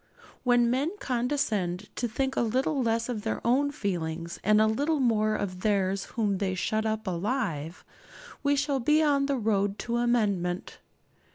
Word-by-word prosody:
When 245 -1 +3
men 270 +5 +1
condescend 225 -8 -1
to 240 - -1
think 265 +4 -2
a - - +1
little 260 +5 0
less 230 -1 0
of 235 -4 -3
their 220 +1 -2
own 270 +5 +3
feelings, 170 - -3
and 215 +1 +4
a 215 - +5
little 285 +8 +1
more 215 -4 +2
of 185 -3 -3
theirs 195 -1 0
whom 205 -4 +1
they 190 -2 -1
shut 220 +4 -1
up 220 0 -2
alive, 180 - -2 0.6
we 285 0 +2
shall 285 -1 0
be 300 +5 +3
on 280 -2 +2
the 280 -1 0
road 205 -3 0
to 235 0 -1
amendment. 205 -7 0
220 Hz, 165 wpm, -28 LUFS, 195-260 Hz, 0.6 s, a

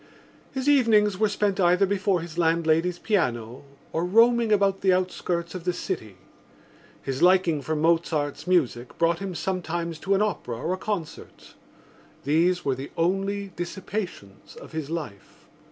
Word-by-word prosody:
His 265 +1 -4
evenings 215 -8 +4
were 215 -1 +3
spent 205 -1 0
either 180 +2 +4
before 195 -2 0
his 170 -1 -8
landlady's 165 +1 +2
piano 125 - -1 0.3
or 165 - -1
roaming 230 +4 +4
about 200 -2 +2
the 190 - +3
outskirts 180 -2 -1
of 185 -2 -6
the 180 0 0
city. 110 - -5 0.9
His 135 +1 -3
liking 180 -4 +4
for 155 +4 -2
Mozart's 160 -1 0
music 130 -9 0
brought 170 0 +2
him 195 -2 -5
sometimes 170 -3 -3
to 195 +3 +1
an 195 - +1
opera 175 - -3
or 165 +9 -2
a - - -3
concert: 190 -5 -6 0.7
these 175 +5 +2
were 135 - +2
the 135 +2 -6
only 195 +4 0
dissipations 175 - -6
of - - -12
his 155 -3 -5
life. 150 -12 -7
175 Hz, 150 wpm, -25 LUFS, 160-195 Hz, 0.9 s, evenings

